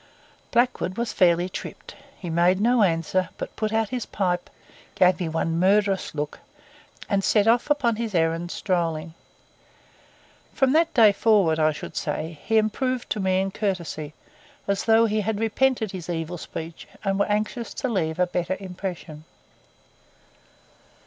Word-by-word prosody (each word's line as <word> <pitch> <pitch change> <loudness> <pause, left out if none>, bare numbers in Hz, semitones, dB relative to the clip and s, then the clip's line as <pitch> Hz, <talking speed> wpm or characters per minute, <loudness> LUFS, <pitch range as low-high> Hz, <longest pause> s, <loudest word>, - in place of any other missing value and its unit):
Blackwood 240 -6 +1
was 235 -1 -2
fairly 175 -1 +3
tripped. 185 - -8 0.2
He 180 - -8
made 175 +3 +3
no 240 +2 +3
answer, 180 0 +1
but - - -6
put 215 -1 -2
out 225 -1 +1
his 250 -2 -4
pipe, 180 -3 -1 0.5
gave 180 0 +4
me 175 -3 -2
one 165 +1 -1
murderous 195 -1 +2
look, 150 0 -4 0.7
and 200 -2 +1
set 205 +1 +3
off 235 +5 +3
upon 250 -7 +2
his 225 -4 -3
errand 165 +1 +1
strolling. 165 -4 -2 1.4
From 270 0 +3
that 330 +1 +3
day 220 -4 +7
forward, 200 -6 +3
I 155 0 +4
should 145 - -8
say, 160 -1 -3
he 225 - +2
improved 245 +4 0
to 215 - 0
me 190 -1 +1
in 195 0 -2
courtesy, 170 -7 -3 0.5
as 200 0 0
though 225 0 +5
he 215 -1 0
had 210 0 -2
repented 225 -1 +1
his 180 -3 -7
evil 170 0 -3
speech 165 +1 -8 0.2
and 195 -1 0
were 200 - +2
anxious 215 +3 -2
to 265 - -2
leave 165 -9 -1
a 180 - +3
better 180 +1 -2
impression. 180 -5 -7
190 Hz, 155 wpm, -24 LUFS, 170-220 Hz, 1.4 s, day